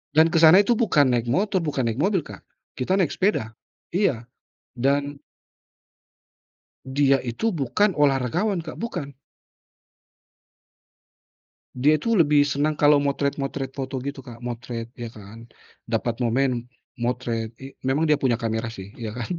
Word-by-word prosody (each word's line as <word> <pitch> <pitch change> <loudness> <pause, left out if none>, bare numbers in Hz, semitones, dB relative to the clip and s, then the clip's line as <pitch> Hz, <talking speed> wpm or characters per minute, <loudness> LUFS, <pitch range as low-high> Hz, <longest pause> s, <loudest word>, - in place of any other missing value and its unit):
Dan 160 +2 +5
kesana 165 +4 +7
itu 240 - +2
bukan 145 - +3
naik 120 -1 0
motor, 190 - +1
bukan 150 -6 -2
naik 115 +4 -2
mobil, 190 -1 +1
Kak. - - -11 0.4
Kita 130 +9 +1
naik 185 -6 +1
sepeda, 185 - 0 0.4
iya 175 - +1 0.5
dan 140 +3 0 1.7
dia 135 0 +2
itu 130 - -2
bukan 170 - +1
olahragawan, 145 - +1
Kak. 160 - -6
Bukan. 175 -11 -5 2.6
Dia 145 +5 +3
tuh 220 +7 +1
lebih 150 -2 +5
senang 145 +2 0
kalau 145 -1 +5
motret-motret 140 -1 -2
foto 135 0 -5
gitu, 140 0 -5
Kak, 120 -3 -11
motret 120 -1 -5
ya 120 - -4
kan. 110 +1 -12 0.4
Dapat 115 +1 -2
momen 125 0 0 0.3
motret 120 -2 -2
i 135 - -8 0.2
memang 140 +4 +1
dia 150 -2 +3
punya 130 -4 +2
kamera 115 0 -2
sih, 100 -3 -9
ya 110 -2 -5
kan? 120 +6 -5
135 Hz, 135 wpm, -24 LUFS, 120-155 Hz, 2.6 s, kesana